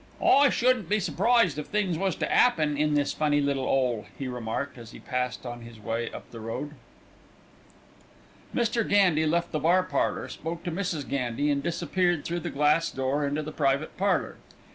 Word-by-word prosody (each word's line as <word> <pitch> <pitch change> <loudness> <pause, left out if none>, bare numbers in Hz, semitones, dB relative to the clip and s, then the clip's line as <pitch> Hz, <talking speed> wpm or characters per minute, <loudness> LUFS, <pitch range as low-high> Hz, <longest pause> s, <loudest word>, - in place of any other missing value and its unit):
"I 280 +1 +5
shouldn't 245 -8 +1
be 210 - +2
surprised 195 - +2
if 150 - -6
things 205 -5 0
was 190 +3 -1
to - - -2
'appen 155 -12 +3
in 150 +1 +1
this 145 -1 +1
funny 150 -1 +1
little 140 -2 0
'ole," 125 -5 0
he 135 - -4
remarked, 125 +2 -4
as 115 -2 -10
he - - -10
passed 125 -1 -3
on 120 -1 -6
his 115 -1 -12
way 115 +2 -3
up - - -10
the 115 - -9
road. 115 +6 -5 1.8
Mr. 235 -1 +1
Gandy 180 -6 +4
left 170 +2 0
the 155 - -1
bar 175 +5 +3
parlour, - - -1
spoke 165 +1 -6
to 175 - -3
Mrs. 165 -5 -3
Gandy, 135 +2 -1
and 140 -1 0
disappeared 175 +1 0
through 175 +1 -2
the - - -4
glass 150 +3 +2
door 135 +2 -1
into 145 +2 -2
the 155 - -6
private 140 0 0
parlour. 200 +1 0
150 Hz, 185 wpm, -27 LUFS, 135-175 Hz, 1.8 s, I